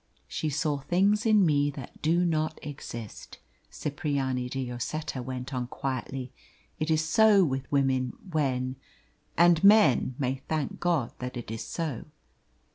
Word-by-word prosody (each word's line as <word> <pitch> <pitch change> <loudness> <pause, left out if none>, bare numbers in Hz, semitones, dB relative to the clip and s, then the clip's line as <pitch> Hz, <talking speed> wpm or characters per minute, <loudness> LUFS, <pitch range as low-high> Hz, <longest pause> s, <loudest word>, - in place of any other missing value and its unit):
"She 155 - -2
saw 150 0 0
things 195 - +2
in 210 -3 +5
me 145 -2 +3
that 140 -3 -9
do 170 +3 +2
not 155 -2 0
exist," 120 -6 -8 0.3
Cipriani 135 -4 -2
de 135 0 -3
Lloseta 125 +3 -4
went 130 +2 -6
on 125 -1 -2
quietly. 130 0 -4 0.5
"It 155 +1 -1
is 160 0 +2
so 205 +4 +5
with 135 -2 -3
women 130 -3 +1 0.2
when 130 -4 0 0.6
and 170 0 +5
men 200 - +5
may 130 0 -2
thank 155 -4 -2
God 165 -9 +1
that 125 0 -5
it 120 -2 -6
is 115 - -4
so." 160 -8 -4
140 Hz, 140 wpm, -28 LUFS, 130-160 Hz, 0.6 s, in